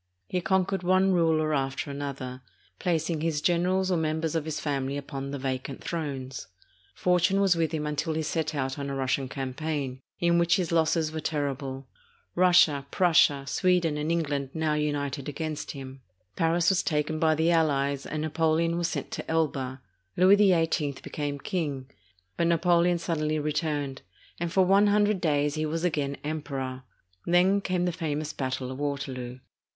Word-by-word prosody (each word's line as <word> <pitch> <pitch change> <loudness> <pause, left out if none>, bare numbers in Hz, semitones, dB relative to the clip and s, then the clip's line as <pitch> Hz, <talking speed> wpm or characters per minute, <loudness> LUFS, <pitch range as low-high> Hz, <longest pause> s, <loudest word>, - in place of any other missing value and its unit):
He 180 - -1
con 190 +1 +2
quered 195 0 -2
one 185 +2 +3
ruler 160 -3 +2
after 135 +1 -1
another, 135 -2 -5 0.4
placing 165 -2 0
his 160 -2 0
generals 180 +3 +1
or 180 - +2
mem 155 -1 0
bers 160 -1 -2
of 160 -2 -1
his 155 -1 -3
family 140 -1 -2
upon 140 -1 -5
the 140 - -4
vacant 130 0 -4
thrones. 135 - -4 0.5
Fortune 180 +2 +2
was 195 -3 +4
with 165 -2 0
him 155 -2 -2
until 150 +1 -2
he 160 - -1
set 155 0 -2
out 135 0 -2
on 140 0 -3
a 140 - -3
Russian 135 0 -1
campaign, 135 0 -3 0.2
in 170 0 +3
which 170 0 +4
his 180 -4 -1
losses 160 -1 +2
were 160 - -4
terrible. 140 -3 -3 0.5
Russia, 175 -6 +4
Prussia, 150 -6 +4
Sweden, 175 0 +2
and 150 +2 -1
Eng 170 0 +2
land 140 -2 -3
now 160 -1 +1
united 145 -2 -2
against 155 +1 -4
him. 135 -1 -9 0.3
Paris 165 +1 +2
was 190 -1 +3
taken 155 0 -1
by 155 -1 +3
the 160 +2 +2
allies, 140 -4 +1
and 155 0 -3
Napoleon 165 +2 +1
was 170 - +1
sent - - -4
to - - -6
Elba. 135 -5 -1 0.4
Louis 185 +3 +7
XVIII 165 -7 +2
became 145 -1 -3
king; 140 -4 -3 0.5
but 170 - +2
Napoleon 170 +1 +3
suddenly 155 -2 -1
returned, 150 -2 -2 0.4
and 170 0 -2
for 190 +1 +4
one 200 +3 +5
hundred 205 -1 +2
days 145 -3 +1
he 155 0 -1
was 165 +2 -2
again 145 -5 -1
Emperor. 135 -4 -4 0.4
Then 185 +3 +4
came 180 -2 0
the 180 - +1
famous 155 -3 -3
battle 130 -1 -3
of 130 - -7
Waterloo. 135 -4 -4
155 Hz, 170 wpm, -27 LUFS, 140-170 Hz, 0.5 s, Louis